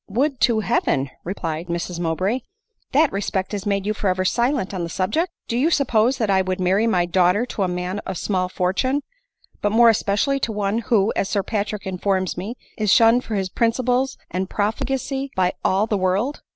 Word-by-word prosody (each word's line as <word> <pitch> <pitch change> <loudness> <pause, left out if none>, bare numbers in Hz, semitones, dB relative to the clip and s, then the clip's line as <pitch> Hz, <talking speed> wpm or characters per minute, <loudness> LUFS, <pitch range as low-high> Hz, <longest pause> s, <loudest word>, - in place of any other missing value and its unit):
" - - -63
Would 260 +6 0
to 220 -1 +3
Heaven 140 - 0
!" - - -41
replied 165 -2 -4
Mrs 170 0 -3
Mowbray, 185 +8 0 0.3
" 450 - -47
that 295 +1 +4
respect 195 -1 -2
had 205 -1 -4
made 200 -1 0
you 210 - 0
forever 185 -3 0
silent 240 -1 0
on 185 - -3
the 170 - -3
subject! 310 - -1 0.2
Do 235 - -2
you 270 +7 +3
suppose 255 -5 +2
that 215 -4 0
I 190 -1 +4
would 185 0 -2
marry 190 +5 +2
my 180 -6 +2
daughter 180 +5 +2
to 230 - -5
a 190 - +2
man 180 +2 -3
of 190 -3 -5
small 185 -1 -1
fortune 255 +11 0 0.3
— - - -35
but 205 - +1
more 230 +2 +6
especially 220 +6 +1
to 235 - -1
one 205 +1 -1
who, 220 -2 +2
as 195 - 0
Sir 200 -2 0
Patrick 210 -1 -3
informs 190 0 -1
me, 200 +7 -5 0.2
is 210 -2 +2
shunned 230 +3 +5
for 220 - -4
his 190 -2 -1
priniciples 250 +3 +1
and 185 +2 -2
profligacy 270 +6 -2
by 185 -1 +2
all 195 +3 +2
the 210 -3 -1
world 195 +10 0
205 Hz, 205 wpm, -22 LUFS, 185-235 Hz, 0.3 s, more